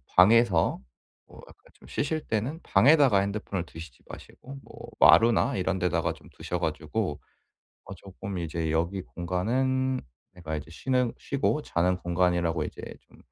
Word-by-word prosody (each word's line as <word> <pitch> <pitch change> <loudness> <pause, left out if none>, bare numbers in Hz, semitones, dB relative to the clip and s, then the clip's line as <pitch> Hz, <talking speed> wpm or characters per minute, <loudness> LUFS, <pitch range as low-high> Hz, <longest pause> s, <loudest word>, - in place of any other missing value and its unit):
방에서 100 - +4 0.4
뭐 - - -17
약간 - - -15 0.2
좀 - - -19
쉬실 155 +2 -3
때는 120 +9 -2
방에다가 130 0 +5
핸드폰을 100 -2 -3
두시지 80 -5 -12
마시고 135 +2 -11
뭐 - - -12
마루나 115 0 +5
이런 95 0 -1
데다가 85 -2 0
좀 - - -17
두셔 90 - -4
가지고 80 +1 -3 0.7
어 100 - -9
쪼끔 95 +1 -8
이제 80 -1 -3
여기 85 +4 -1
공간은 130 +10 -1 0.3
내가 80 -3 -6
이제 75 +1 -8
쉬는 125 +6 0
쉬고 145 +2 -1
자는 90 +2 0
공간이라고 85 -2 0
이제 - - -8 0.2
좀 - - -23
95 Hz, 305 characters per minute, -27 LUFS, 85-120 Hz, 0.7 s, 방에다가